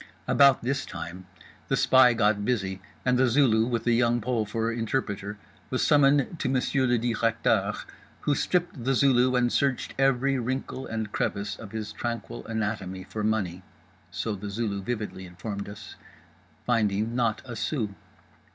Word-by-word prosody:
About 140 -3 +5
this 135 +2 -1
time 90 +2 -8 0.4
The - - +1
Spy 130 -2 +6
got 105 -2 +2
busy 95 -5 -1 0.2
and 125 -1 +3
The 130 - +5
Zulu, 115 -3 +4
with 120 -2 -1
The 120 - +2
Young 120 0 +3
Pole 115 -2 -1
for 115 +2 -1
interpreter, 105 -3 -2 0.3
was - - 0
summoned 145 +2 +3
to 130 - -1
Monsieur 130 0 +1
le 120 0 +3
Directeur, 115 -1 +1 0.5
who 145 - +1
stripped 175 -3 -1
The 135 +2 +1
Zulu 130 -1 +4
and 120 -1 +2
searched 135 -3 0
every 135 0 +2
wrinkle 130 +2 -3
and 110 -2 -4
crevice 100 -1 -2
of 100 -1 -10
his 110 -2 -5
tranquil 120 0 -4
anatomy 105 -4 -3
for 105 +3 -5
money 100 -5 -1 0.5
(so 110 - -3
The 100 +1 -6
Zulu 100 -1 -2
vividly 105 -4 -4
informed 100 +3 -6
us)—finding 105 +1 -4
not 115 -3 0
a 120 -2 -7
sou. 110 -2 -2
115 Hz, 150 wpm, -27 LUFS, 105-125 Hz, 0.5 s, Spy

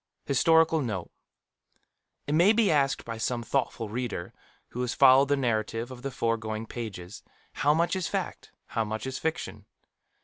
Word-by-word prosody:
Historical 160 +3 +4
Note. 105 -9 -4 1.1
It 145 - -2
may 175 +7 +5
be 225 -2 +3
asked 140 -2 +1
by 115 -1 -6
some 120 +1 -1
thoughtful 120 -3 -1
reader 115 -5 -4 0.4
who 125 - -5
has 125 -1 -2
followed 135 +2 +6
the 145 0 +2
narrative 115 -1 -1
of 125 -1 -9
the 140 - -3
foregoing 115 -3 -2
pages, 105 -5 -7 0.3
How 150 +1 +2
much 170 +3 +1
is 185 -3 -1
fact, - - -4
how 115 -1 -1
much 110 +3 -4
fiction? 110 - -4
125 Hz, 150 wpm, -28 LUFS, 110-145 Hz, 1.1 s, followed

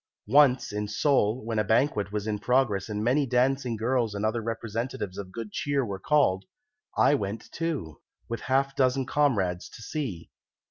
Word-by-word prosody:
Once 130 +2 +4
in 105 0 -2
Seoul, 110 -1 +1
when 115 -1 -1
a - - +3
banquet 105 -2 +1
was 105 -1 -3
in 105 -1 -2
progress 120 -6 +1
and 105 0 -2
many 135 +4 +2
dancing 125 0 +1
girls 115 -1 0
and 100 +1 -1
other 110 +2 0
representatives 115 -1 -4
of 95 -2 -7
good 115 +1 -6
cheer 140 -2 0
were 100 -3 -5
called, 115 -9 +2 0.5
I - - +5
went 105 -5 -3
too, 150 - -4 0.3
with 115 - -4
a - - -9
half 135 +1 +1
dozen 130 0 +2
comrades, 100 -12 +1
to 115 - -12
see. 120 - -5
115 Hz, 175 wpm, -27 LUFS, 105-135 Hz, 0.5 s, I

